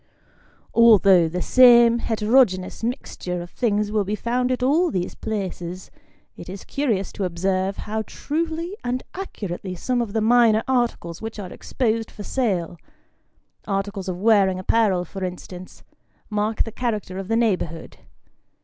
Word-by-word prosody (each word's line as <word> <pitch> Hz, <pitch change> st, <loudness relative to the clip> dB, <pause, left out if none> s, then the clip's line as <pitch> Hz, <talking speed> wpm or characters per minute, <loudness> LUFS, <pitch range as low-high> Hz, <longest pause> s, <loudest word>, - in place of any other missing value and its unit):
Although 200 Hz, -7 st, +6 dB
the 180 Hz, +2 st, -3 dB
same 240 Hz, -2 st, +6 dB
heterogeneous 220 Hz, -4 st, +1 dB
mixture 225 Hz, -7 st, -4 dB
of 175 Hz, 0 st, -8 dB
things 210 Hz, -3 st, 0 dB
will 210 Hz, -1 st, +1 dB
be 205 Hz, +2 st, -2 dB
found 250 Hz, +3 st, -1 dB
at 250 Hz, 0 st, -1 dB
all 320 Hz, +7 st, +3 dB
these 180 Hz, -, -3 dB
places, 185 Hz, -4 st, -5 dB, 0.4 s
it 170 Hz, -, -10 dB
is 195 Hz, +1 st, -7 dB
curious 225 Hz, -9 st, -1 dB
to 200 Hz, -, -4 dB
observe 185 Hz, +2 st, -1 dB
how 220 Hz, +1 st, -3 dB
truly 330 Hz, +4 st, -3 dB
and 250 Hz, +1 st, -2 dB
accurately 195 Hz, -, -6 dB
some 245 Hz, +7 st, -1 dB
of 220 Hz, -4 st, -4 dB
the 225 Hz, -, +1 dB
minor 225 Hz, -1 st, +4 dB
articles 240 Hz, -10 st, -1 dB
which 225 Hz, 0 st, -6 dB
are 190 Hz, -4 st, -7 dB
exposed 225 Hz, -2 st, -2 dB
for 205 Hz, -, -9 dB
sale 185 Hz, -10 st, -1 dB, 0.9 s
articles 195 Hz, -1 st, -3 dB
of 180 Hz, -1 st, -4 dB
wearing 200 Hz, -3 st, +4 dB
apparel, 185 Hz, -1 st, +1 dB
for 190 Hz, +3 st, -7 dB
instance 180 Hz, 0 st, -8 dB, 0.5 s
mark 210 Hz, +1 st, 0 dB
the 225 Hz, -, -7 dB
character 210 Hz, -6 st, -3 dB
of 195 Hz, -, -6 dB
the 225 Hz, -, 0 dB
neighbourhood. 180 Hz, -8 st, -1 dB
210 Hz, 145 wpm, -23 LUFS, 185-235 Hz, 0.9 s, Although